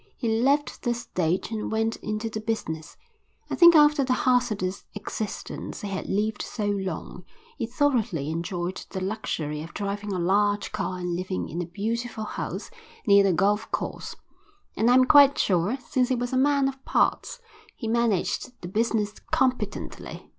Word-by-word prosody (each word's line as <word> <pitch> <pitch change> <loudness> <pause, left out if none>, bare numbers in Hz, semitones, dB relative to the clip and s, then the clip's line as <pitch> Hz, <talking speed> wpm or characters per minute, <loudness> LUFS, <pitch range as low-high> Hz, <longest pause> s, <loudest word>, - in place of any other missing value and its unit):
He 235 - -2
left 285 +3 +1
the 240 -1 0
stage 180 -4 -1
and 220 -1 -3
went 225 +1 0
into 215 +1 -3
the 220 -1 -4
business. 175 -8 -4 0.5
I - - 0
think 340 -1 +8
after 295 -1 +6
the 255 -1 +1
hazardous 220 -7 +1
existence 205 0 -5
he 205 - -4
had 190 -1 -4
lived 210 +2 0
so 215 - -4
long, 200 -2 -3 0.4
he 230 - -1
thoroughly 230 - 0
enjoyed 175 +2 -3
the 190 - -4
luxury 175 -7 -3
of 165 +2 -10
driving 205 0 -3
a 190 - -1
large 205 +3 +1
car 195 -3 -3
and 180 -1 -2
living 185 +1 -3
in 170 +3 -3
a 175 - -4
beautiful 225 +5 -3
house 215 - -5 0.3
near 200 -2 +6
the 195 - +3
golf 205 +5 +1
course, - - -4 0.6
and 225 +3 +2
I 250 - +6
am 255 0 +6
quite 280 0 +7
sure, 190 +6 +1
since 250 -1 +1
he 260 - +2
was 245 +1 -3
a - - +2
man 280 +1 +3
of 270 0 -5
parts, - - +1 0.4
he 225 - -5
managed 235 +1 0
the - - -4
business 215 0 0 0.2
competently. 250 -6 -2
215 Hz, 170 wpm, -26 LUFS, 190-245 Hz, 0.6 s, think